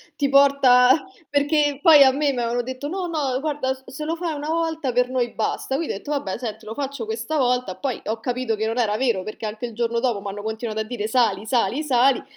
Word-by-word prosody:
ti 280 -2 0
porta 275 +1 +5 0.2
perché, 290 0 +1
poi, 310 -5 +8
a 265 - +6
me 285 0 +1
m'avevano 240 -1 -1
detto: 260 +3 -6
"No, 365 +2 -3
no, 285 -6 -1
guarda, 290 -3 -1
s 265 - -17
se 300 +4 -6
lo 325 - -1
fai 335 -1 -3
una 295 0 -5
volta 320 -5 -1
per 250 +1 +2
noi 250 -2 -1
basta". 245 +4 -2
Quindi 320 +3 -2
ho - - -4
detto: 290 - -8
"Vabbè, 240 -10 -2
senti 230 -3 -6
lo 220 - -6
faccio 280 -1 -4
questa 225 +7 -4
volta", 250 -7 0
poi 265 -4 -4
ho 225 +1 -3
capito 245 -1 -1
che 215 +1 -2
non 225 +2 -2
era 210 -3 +1
vero 230 -6 0
perché 215 +2 -7
anche 215 +3 -4
il 235 - -7
giorno 235 +1 -1
dopo 235 -4 -1
m'hanno 200 +1 -6
continuato 220 0 -4
a - - 0
dire 215 -1 -4
"Sali, 220 -4 +1
sali, 240 +4 0
sali", 265 -2 +3
255 Hz, 235 wpm, -22 LUFS, 225-285 Hz, 0.2 s, poi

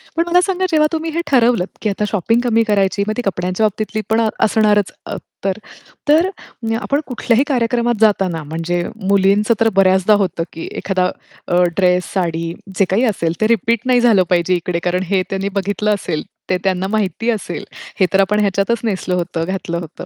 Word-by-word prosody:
पण 335 - +2
मला 355 +1 +4
सांगा, 375 0 0
जेव्हा 305 -1 +4
तुम्ही 325 0 -2
हे 335 +2 -1
ठरवलत 240 -8 +3
की 215 - 0
आता 200 +1 -2
शॉपिंग 225 +4 +1
कमी 230 -2 +2
करायची. 200 -1 +1
मग 215 - 0
ती - - 0
कपड्यांच्या 185 +2 0
बाबतीतली 215 +1 -2
पण 220 +1 +3 0.2
असणारच 210 -1 +2
अ, - - -5 0.3
तर. 195 0 0 0.5
तर 325 +5 +5 0.5
आपण 285 +1 0
कुठल्याही 250 0 +1
कार्यक्रमात 240 -2 +1
जाताना 195 -6 +2
म्हणजे 165 +3 -2 0.3
मुलींचं 200 +3 +3
तर 225 -1 +4
बऱ्याचदा 190 +1 +4
होतं 180 -3 -1
की 165 - -7
एखादा 185 -1 0 0.4
अ, 175 +1 +2 0.2
ड्रेस, 180 -1 +3
साडी, 165 -3 -1 0.2
जे 195 - +4
काही 200 +6 +2
असेल 170 -7 0
ते 215 - +4
रिपीट 230 0 +2
नाही 250 -1 +3
झालं 220 -6 +5
पाहिजे 180 0 +2
इकडे. 175 0 -2
कारण 180 +1 0
हे 195 -2 +3
त्यांनी 195 +1 -2
बघितलं 205 +2 0
असेल, 165 -6 -3 0.3
ते 185 - +2
त्यांना 190 -1 0
माहिती 215 +2 -1
असेल. 215 -3 -4 0.3
हे 190 - +5
तर 195 - +4
आपण 210 +2 +1
ह्याच्यातच 200 +3 +1
नेसलं 190 -4 -1
होतं, 170 -2 -2
घातलं 185 -2 -3
होतं. 165 -3 -9
200 Hz, 185 wpm, -18 LUFS, 185-230 Hz, 0.5 s, तर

